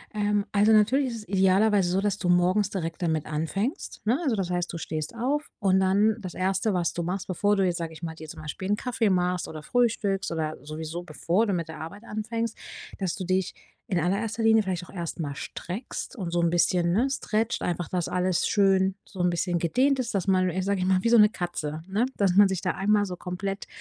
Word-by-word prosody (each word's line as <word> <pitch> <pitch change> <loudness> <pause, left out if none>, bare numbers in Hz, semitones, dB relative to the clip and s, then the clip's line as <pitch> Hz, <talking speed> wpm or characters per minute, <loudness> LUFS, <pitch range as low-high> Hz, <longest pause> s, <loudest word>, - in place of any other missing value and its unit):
Ähm, 205 -1 +1
also, 210 +2 +4
natürlich 235 +6 +4
ist 235 - -5
es 215 - -10
idealerweise 195 0 +3
so, 185 - +2
dass 205 0 0
du 180 -3 -2
morgens 180 +3 +3
direkt 165 -4 -4
damit 160 -3 0
anfängst, 195 - -3
ne, 235 +5 +3
also, 265 -8 +1
das 190 -3 -1
heißt, 175 -1 -1
du - - -5
stehst 155 0 -4
auf 275 +6 -2
und 190 -1 +3
dann 205 +3 +3
das 185 -3 -6
Erste, 190 +3 0
was 175 -2 0
du 175 - -3
machst, 180 +3 -3
bevor 205 +3 +1
du 195 - +3
jetzt, 175 -2 0
sage 165 -2 -4
ich 155 - -12
mal, 165 -2 -5
dir 160 -1 -10
zum - - -9
Beispiel 155 +5 -5
'n 205 - +2
Kaffee 235 -3 0
machst 180 -1 +1
oder 155 -1 -7
frühstückst 205 -2 0
oder 155 -1 -2
sowieso 160 +3 -5
bevor 175 +5 0
du 200 - 0
mit 170 -2 -2
der 160 - -8
Arbeit 200 +7 -8
anfängst, 225 +1 -3 0.4
dass 190 -4 -2
du 190 - -5
dich 185 0 0 0.3
in 180 - 0
allererster 200 +7 -1
Linie 225 -1 +5
vielleicht 185 -3 -3
auch - - -15
erst 170 -2 -5
mal 145 -3 -3
streckst 195 - -6
und 185 -8 -4
so 175 - +1
'n 170 - +3
bisschen, 175 0 +2
ne, 230 +9 +2
stretchst 225 -4 -1
einfach, 175 -1 -2
dass 180 -2 -1
alles 180 -1 +1
schön 195 -2 +3
so 190 - -12
'n 180 - +3
bisschen 175 0 0
gedehnt 260 - +2
ist, 235 -4 -2
dass 195 -1 -1
man 185 -1 +3
sage 200 0 0
ich 185 - 0
mal, 185 0 +2
wie 230 - +2
so 235 -1 +6
'ne 210 0 +7
Katze, 160 -5 -4
ne, 210 +6 +1
dass 195 -3 +3
man 205 0 +8
sich 190 -2 -2
da - - 0
einmal 205 +1 +2
so 185 -2 -5
komplett, 190 +3 -5
190 Hz, 230 wpm, -26 LUFS, 175-210 Hz, 0.4 s, man